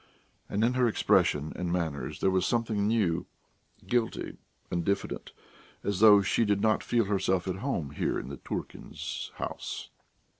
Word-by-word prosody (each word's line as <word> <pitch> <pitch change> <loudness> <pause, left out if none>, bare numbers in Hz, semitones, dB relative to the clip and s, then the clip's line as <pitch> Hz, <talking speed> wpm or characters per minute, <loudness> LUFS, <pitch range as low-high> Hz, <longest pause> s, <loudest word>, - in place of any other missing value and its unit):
And 105 - 0
in 120 +2 +3
her 125 -1 +3
expression 75 -8 +2
and 90 -1 -2
manners 80 -6 -2
there 95 - +3
was 95 -1 +2
something 110 -4 +1
new 105 -7 +1 0.6
guilty 120 -2 -1 0.3
and 85 -1 0
diffident, 100 +3 -2 0.5
as 100 -2 -1
though 105 -2 +8
she 105 - +2
did 105 -2 +2
not 110 +1 +2
feel 115 -2 +1
herself 95 -2 0
at 95 -1 -2
home 95 - -2
here - - -1
in - - -5
the - - -6
Turkins' - - -6
house. - - -5
100 Hz, 155 wpm, -29 LUFS, 90-110 Hz, 0.6 s, though